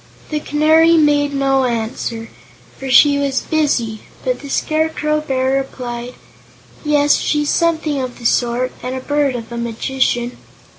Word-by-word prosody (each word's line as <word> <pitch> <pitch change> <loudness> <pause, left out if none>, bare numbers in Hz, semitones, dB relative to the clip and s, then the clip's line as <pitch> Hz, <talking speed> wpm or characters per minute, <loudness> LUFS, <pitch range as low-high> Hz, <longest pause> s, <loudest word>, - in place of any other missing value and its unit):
The 305 - 0
Canary 315 +3 +4
made 290 -2 +3
no 270 -1 +1
answer, 230 -1 -3 0.5
for 270 - -5
she 285 +3 +6
was 275 -3 0
busy, 245 -9 -1 0.2
but - - -1
the 285 - -9
Scarecrow 310 0 0
Bear 265 -3 -1
replied: 250 -2 -5 0.7
"Yes; 295 -1 +3
she's 295 -1 0
something 315 -4 0
of 255 -1 -5
the 235 - -12
sort, 245 +2 +1
and 255 +1 -4
a - - -3
bird 285 0 0
of 230 -1 -7
a 235 - -5
magician." 240 +1 -1
270 Hz, 145 wpm, -17 LUFS, 245-300 Hz, 0.7 s, she